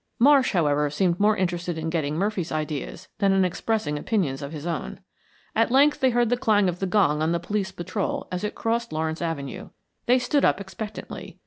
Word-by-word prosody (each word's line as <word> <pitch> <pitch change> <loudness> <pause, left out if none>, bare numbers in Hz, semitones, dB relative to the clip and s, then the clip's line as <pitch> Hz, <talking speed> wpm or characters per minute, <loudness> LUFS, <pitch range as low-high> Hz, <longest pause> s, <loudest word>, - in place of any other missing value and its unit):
Marsh, 270 0 +5
however, 150 -4 +2
seemed 170 +4 0
more 210 +1 +3
interested 175 -2 -2
in 160 0 -3
getting 155 -3 -1
Murphy's 190 -1 -1
ideas 155 +3 -4
than 195 -2 +3
in 190 -1 +3
expressing 180 -4 -1
opinions 155 - -1
of 140 0 -6
his 155 -1 -7
own. 170 -1 -4 0.6
At 225 +1 +3
length 280 +4 +4
they 260 - +4
heard 240 -1 +2
the 245 - +2
clang 215 -6 +3
of 180 0 -2
the 195 - -1
gong 175 -6 +2
on 160 +2 +1
the 170 - 0
police 195 +2 -2
patrol 185 +2 -3
as 180 +1 -3
it 210 - -3
crossed 235 +1 -1
Lawrence 160 +1 -2
Avenue. 160 -5 -4 0.4
They 250 +1 +5
stood 255 +3 +1
up - - +3
expectantly. 200 +2 -8
185 Hz, 200 wpm, -25 LUFS, 160-220 Hz, 0.6 s, Marsh